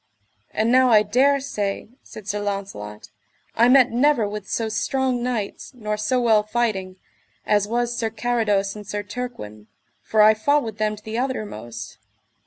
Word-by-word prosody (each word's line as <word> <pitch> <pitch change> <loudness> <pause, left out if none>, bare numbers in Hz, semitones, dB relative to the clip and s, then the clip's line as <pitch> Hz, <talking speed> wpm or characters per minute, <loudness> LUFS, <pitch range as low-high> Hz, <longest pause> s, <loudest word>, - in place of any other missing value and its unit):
And 220 +2 0
now 255 0 +5
I 215 -2 +6
dare 265 +7 +3
say, 210 -8 -3
said 215 -2 -12
Sir 210 0 -2
Launcelot, 195 - -5 0.4
I 235 +2 +5
met 260 -1 +6
never 245 -2 +3
with 205 -1 -7
so 225 - -1
strong 250 +3 -1
knights, 240 +1 -4
nor 210 -3 -3
so 215 +5 0
well 225 -3 +4
fighting, 210 -4 -2 0.5
as 205 -1 +2
was 240 +1 -1
Sir 225 -2 -1
Carados 215 -4 0
and 210 -1 -10
Sir 205 0 -3
Turquin, 200 - -7 0.3
for 215 -1 +3
I 215 +1 +7
fought 285 +7 +2
with 220 -2 -7
them 215 0 0
to 210 - -16
the 220 +2 -4
uttermost. 210 - -5
215 Hz, 165 wpm, -23 LUFS, 205-245 Hz, 0.5 s, I